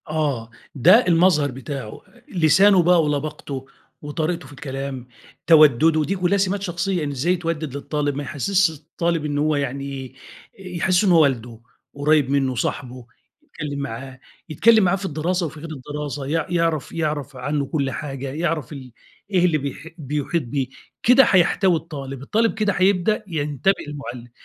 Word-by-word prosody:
آه، 145 -7 -2 0.3
ده 210 - +6
المظهر 165 -5 +3
بتاعه، 130 -3 -7 0.3
لسانه 180 +2 +5
بقى 175 -1 +4
ولباقته 145 -2 -3 0.4
وطريقته 155 +1 -3
في 145 - -13
الكلام 135 -3 -6 0.4
توَدُّده، 155 0 +5
دي 190 +6 -1
كلّها 180 +1 +1
سِمات 195 0 0
شخصية، 180 -1 -2
إن 145 - -2
إزاي 140 +7 0
يتودِّد 165 -5 -3
للطالب 145 0 -2
ما 145 - -3
يحسّسش 180 +7 +1
الطالب 165 +1 -2
إنه 145 -1 -1
هو 155 0 +2
يعني، 140 -1 -4 0.5
يحسّسه 185 +1 0
إن - - +4
هو 165 -2 +6
والده 120 -5 -1 0.3
قريب 145 -1 +2
مِنُّه، 135 -2 +1
صاحبه، 125 +1 -4 0.5
يتكلّم 145 -2 -4
معاه، 130 -1 -6 0.3
يتكلّم 220 +7 +5
معاه 180 +1 +3
في 195 0 -6
الدراسة 175 +2 -1
وفي 155 0 -7
غير 165 +2 -8
الدراسة، 145 -1 -6
يع 155 +2 -1
يعرّف 165 -4 0
يعرَف 150 -3 -3
عنّه 140 +3 -2
كلّ 140 -2 -2
حاجة، 135 -1 -5
يعرَف 160 0 -2
ال 130 -3 -10 0.4
إيه 180 -2 +3
اللي 165 -3 +2
بيح 140 +2 -6
بيحيط 150 +2 -2
به، 130 +2 -2 0.4
كده 250 +3 +7
هيحتوي 185 -1 +3
الطالب، 140 -5 -6
الطالب 225 +11 +1
كده 210 -2 0
هيبدأ 195 +4 +2
ينتبه 150 +1 0
للمُعلِّم، 125 -5 -8
150 Hz, 150 wpm, -22 LUFS, 140-175 Hz, 0.5 s, كده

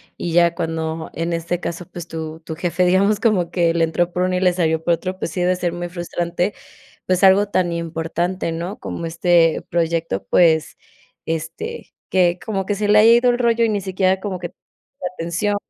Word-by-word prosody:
y 170 - -4
ya 170 0 +4
cuando, 160 -1 -3
en 165 +1 -2
este 170 +1 -2
caso, 175 0 -5
pues, 175 -1 -9
tu 160 -1 -6
tu 160 0 -7
jefe, 175 +2 0
digamos, 200 +3 +3
como 195 -7 +1
que 170 -2 +2
le 170 0 +2
entró 175 +2 0
por 180 - 0
uno 185 0 0
y - - 0
le 180 -1 +3
salió 160 -3 0
por 170 - +2
otro, 185 +3 -4
pues 165 - -3
sí 180 - -3
debe 180 +1 +2
ser 175 -2 -1
muy 175 0 -5
frustrante, 175 +2 -2 0.5
pues 185 +1 +1
algo 195 +1 +6
tan 185 -3 0
importante, 170 +2 -2
¿no? 170 +5 -4
Como 170 - -6
este 165 0 +2
proyecto, 165 - -1
pues, 160 - +3 0.5
este, 165 - -5 0.2
que 180 -1 +2
como 195 -4 -2
que 205 - -1
se 205 +1 -1
le 210 0 +6
ha 215 - +6
ido 235 +2 +6
el 240 - +2
rollo 235 -1 +2
y 230 - +3
ni 210 -1 0
siquiera 190 0 0
como 190 -2 -4
que 175 -1 -5 0.5
la 180 - -3
atención 175 +5 -1
175 Hz, 205 wpm, -20 LUFS, 165-190 Hz, 0.5 s, algo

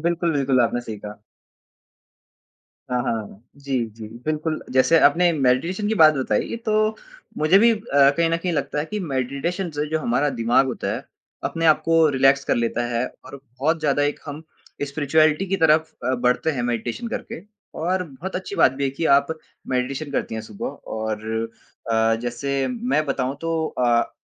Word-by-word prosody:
बिल्कुल, 170 0 0
बिल्कुल, 135 -3 +2
आपने 120 +1 +1
सही 110 -3 -7
कहा। 105 +1 -9 1.7
हाँ, 125 0 0
हाँ, 130 - -1
हाँ, 110 -2 -3
हाँ, 100 - -17
जी, 135 -3 -2
जी, 110 0 -10 0.2
बिल्कुल। 155 +1 -2
जैसे, 130 +6 +5
आपने 170 +4 +5
मेडिटेशन 160 +9 +1
की 220 - +1
बात 155 -6 +6
बताई 130 - -1
तो 215 0 +2 0.4
मुझे 155 +5 +5
भी 230 +3 +6
अ, 215 - -4 0.4
कहीं 170 -1 +2
न 165 - +2
कहीं 175 +1 -2
लगता 150 -2 -2
है 150 - 0
कि 210 +6 -4
मेडिटेशन 150 +5 -2
से 150 0 -2
जो 160 - +1
हमारा 140 +3 +1
दिमाग 120 +1 +2
होता 120 -6 -3
है, 125 +4 -6 0.4
अपने 165 0 -1
आप 155 - +4
को 165 -1 +4
रिलैक्स 135 +1 +3
कर - - +1
लेता 120 +1 0
है 120 +2 0 0.2
और - - -9 0.2
बहुत 160 +3 +2
ज़्यादा 145 -2 +1
एक 145 0 0
हम 150 +2 -7 0.4
स्पिरिचुअलिटी 155 +4 +2
की 195 +1 0
तरफ 160 -1 +3
अ, 130 +1 +1
बढ़ते 125 +5 +1
हैं 135 -5 -2
मेडिटेशन 120 - -3
करके। 170 - -6 0.4
और 180 +3 0
बहुत 165 +5 -7
अच्छी 185 +2 -6
बात 130 - +5
भी 140 +1 -2
है 135 - +1
कि 140 +5 -4
आप 140 0 +2 0.4
मेडिटेशन 135 +3 -2
करती 135 - -2
हैं 110 - -4
सुबह 200 - -7 0.3
और 110 -1 -3 0.7
अ, 115 0 +3
जैसे 135 +3 -2
मैं 245 -9 0
बताऊँ 135 0 -1
तो 165 -1 -1
अ, 120 -1 +2
145 Hz, 185 wpm, -22 LUFS, 125-165 Hz, 1.7 s, बात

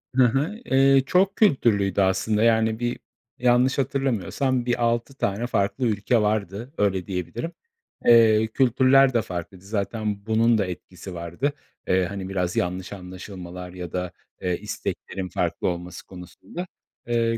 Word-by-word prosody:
Hı 130 -1 +6
hı. 145 - 0
Eee, 135 0 +4
çok 190 +6 +2
kültürlüydü 105 - +3
aslında. 100 +3 +2
Yani, 110 -1 +3
bir 120 0 -2 0.4
yanlış 125 +1 +3
hatırlamıyorsam 130 -1 0
bir 120 0 0
6 115 +3 0
tane 110 -1 -1
farklı 100 +3 0
ülke 110 +2 +1
vardı, 105 +4 -2
öyle 95 -3 0
diyebilirim. 95 - -4 0.5
Eee, 110 -2 +6
kültürler 130 +3 +4
de 115 - +3
farklıydı. 90 -1 -7
Zaten 105 0 -3
bunun 115 +1 +3
da 100 - +1
etkisi 90 +1 -8
vardı. 85 - -2 0.3
Eee, 95 0 +3
hani, 95 0 -5
biraz 90 -2 -1
yanlış 90 +2 -2
anlaşılmalar 90 -1 -8
ya 90 -3 -7
da, 90 -1 -3 0.3
eee, 90 -1 0
isteklerin 95 0 -5
farklı 85 -1 -1
olması 90 0 -5
konusunda, 95 - -9 0.4
eee, 115 -1 +1
110 Hz, 140 wpm, -24 LUFS, 95-120 Hz, 0.5 s, Hı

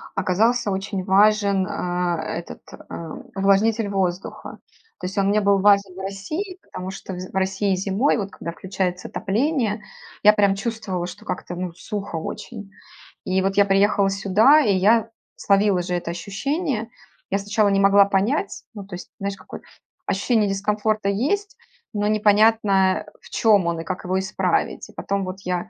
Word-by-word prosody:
оказался 210 +4 +1
очень 195 0 -3
важен, 200 0 +3
а, 175 -1 -1
э, 165 - -3
этот, 170 - -10
э, 165 -1 -9 0.3
увлажнитель 205 +3 +2
воздуха. 190 -2 -3 0.4
То 180 - -4
есть 190 - -8
он 195 -1 +2
мне 210 +1 +3
был 200 -1 +3
важен 200 -1 +3
в 190 - -9
России. 305 - -5
Потому 185 +1 -7
что 190 0 -8
вз 185 +1 -7
в - - -14
России 190 +1 +1
зимой, 195 +8 +1
вот 200 -2 -4
когда 170 - -6
включается 185 0 -3
отопление, 225 0 -1 0.4
я 210 - +8
прям 200 -2 +3
чувствовала, 195 -5 -3
что 175 - -11
как-то, 180 - -5
ну, 180 -1 -4
сухо 205 -1 -6
очень. 205 +5 -7 0.5
И 190 +1 +1
вот 195 +1 -1
я 200 - +6
приехала 200 0 +3
сюда, 200 +10 +4
и 205 -7 +2
я 220 +4 +3 0.3
словила 200 -2 +2
же 180 0 -2
это 170 -1 -3
ощущение. 230 - -3 0.4
Я 195 - +1
сначала 205 +1 +1
не 195 0 +2
могла 200 0 +6
понять. 205 - -1
Ну, 200 -2 -7
то 195 - -8
есть, 180 - -10
знаешь 200 0 -3
какое - - -10 0.4
ощущение 210 +2 +1
дискомфорта 210 +1 0
есть, 380 - -1 0.4
но 205 -1 0
непонятно, 210 -2 +3 0.2
в - - -16
чём 210 -5 +3
он 170 -1 -1
и - - -7
как 185 +1 -5
его 185 +1 0
исправить. 190 +1 -1
Потом 200 -1 -2
вот 185 +1 -6
я 180 +2 -3
195 Hz, 165 wpm, -22 LUFS, 190-210 Hz, 0.5 s, я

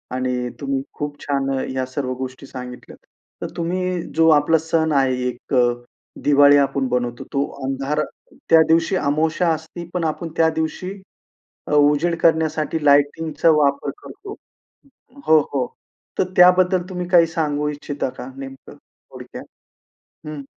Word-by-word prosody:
आणि 125 -1 -2
तुम्ही 135 -1 -1
खूप 145 0 -5
छान 140 -1 -1
अ, - - -1
ह्या 130 0 -2
सर्व 130 0 -3
गोष्टी 130 +1 -8
सांगितल्यात. 125 -2 -9 0.4
तर - - -3
तुम्ही 180 +1 -1
जो 165 0 +5
आपला 160 +3 +2
सण 160 0 0
आहे 130 -1 0
एक 125 +2 -7
अ, 125 - +5 0.6
दिवाळी 145 0 +6
आपण 140 -1 +1
बनवतो. 120 -1 -2
तो 140 0 +1 0.2
अंधार 135 +3 -1 0.5
त्या 165 -1 +7
दिवशी 165 +4 +2
अमावास्या 160 +2 +1
असती 160 +2 -8
पण 180 -2 -1
आपण 165 +2 -3
त्या 165 0 +4
दिवशी 160 +3 -3 0.8
अ, - - -5
उजेड 150 +4 +3
करण्यासाठी 160 -1 +1
लायटिंगचा 145 +3 +3
वापर 140 -2 +1
करतो. 405 +1 -10 0.9
हो, 155 0 +7
हो, 130 -3 +1 0.5
तर - - +5
त्याबद्दल 180 +1 +5
तुम्ही 180 -1 -4
काही 175 -2 +6
सांगू 150 -2 -1
इच्छिता 145 -2 -4
का - - -7
नेमकं 135 -1 -10
थोडक्यात? - - -13 0.8
हं. 150 -2 -6
150 Hz, 140 wpm, -21 LUFS, 135-165 Hz, 0.9 s, त्या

